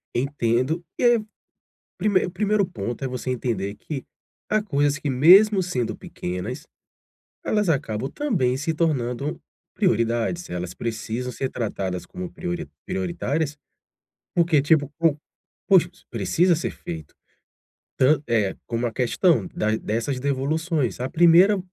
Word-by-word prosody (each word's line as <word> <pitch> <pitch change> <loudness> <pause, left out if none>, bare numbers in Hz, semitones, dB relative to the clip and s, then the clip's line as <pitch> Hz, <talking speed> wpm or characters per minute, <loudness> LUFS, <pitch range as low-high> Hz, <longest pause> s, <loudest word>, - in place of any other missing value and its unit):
Entendo, 130 +4 0 0.2
e - - 0
ai, 235 -3 +4 0.7
primei 205 -4 +2
o - - -5
primeiro 210 +1 +1
ponto 120 - -5
é - - 0
você 125 0 -4
entender 105 -5 -2
que 135 +3 -6 0.5
há 215 0 +3
coisas 145 -7 +1
que 145 - -3
mesmo 185 +9 +6
sendo 145 -10 -2
pequenas, 105 - -5 0.8
elas 210 -3 +1
acabam 130 -4 -1
também 175 - 0
se 155 +4 -1
tornando 140 -3 -1 0.4
prioridades, 115 +10 0
elas 90 0 -4
precisam 115 +2 -4
ser 130 +2 -3
tratadas 95 -7 -3
como 185 -2 -7
priori 175 0 -4 0.2
prioritárias, 165 -5 -2 0.8
porque 170 -4 +4
tipo, 145 -1 +3
po 165 -3 +3 0.5
poxa, 180 -3 +5 0.2
precisa 160 - +2
ser 170 - -2
feito. 80 -3 -8 0.8
Tan 140 +2 +4
é 105 -5 +1
como 120 0 -1
a 115 - -3
questão 125 - +2
da 110 0 +1
dessas 115 +5 -2
devoluções. 140 0 -1
A 130 - -1
primeira 175 +6 +6
140 Hz, 130 wpm, -24 LUFS, 120-175 Hz, 0.8 s, mesmo